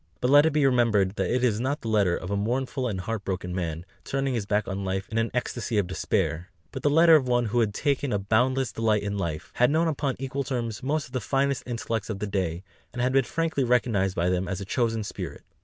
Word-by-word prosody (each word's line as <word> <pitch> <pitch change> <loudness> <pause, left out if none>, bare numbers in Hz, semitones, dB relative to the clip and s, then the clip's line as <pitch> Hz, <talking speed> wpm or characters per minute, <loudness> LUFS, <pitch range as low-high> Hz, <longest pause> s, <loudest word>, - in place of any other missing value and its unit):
But 125 +1 +1
let 145 +2 +7
it - - +1
be 150 -2 +3
remembered 115 -7 +3
that - - 0
it 125 0 +1
is 110 -4 +2
not 135 +4 -1
the - - -6
letter 100 -5 +2
of 90 - -6
a - - +1
mournful 125 +5 -1
and 95 -5 -3
heart 110 +1 -4
broken 90 -2 -3
man, 85 -2 -3 0.2
turning 135 -1 -1
his 110 -4 -2
back 105 +1 0
on 95 0 -3
life 95 0 -2
in 115 0 -1
an 115 0 0
ecstasy 120 -2 -2
of 100 - +2
despair; 90 -1 -1 0.2
but 130 - -6
the 145 - +2
letter 165 +2 +7
of 135 -4 +3
one 120 -1 +2
who 120 +2 0
had 110 -3 +2
taken 140 +3 -1
a 105 - +2
boundless 120 +5 +1
delight 110 -2 +1
in 100 0 -2
life, 80 -5 -4
had 125 +1 +5
known 160 +3 +2
upon 145 -3 -1
equal 135 +1 -3
terms 120 -6 -3
most 145 +3 -1
of - - -16
the 130 -2 -2
finest 140 +1 0
intellects 115 -3 -3
of 105 - -3
the 105 - -3
day, 95 -4 -2 0.3
and 125 - -8
had 130 +1 +1
been 135 -2 +4
frankly 165 -3 -1
recognised 115 -6 +1
by 85 +1 +1
them 90 0 0
as 95 0 -3
a 100 - -5
chosen 115 +1 0
spirit. - - -7
115 Hz, 250 wpm, -26 LUFS, 100-130 Hz, 0.3 s, let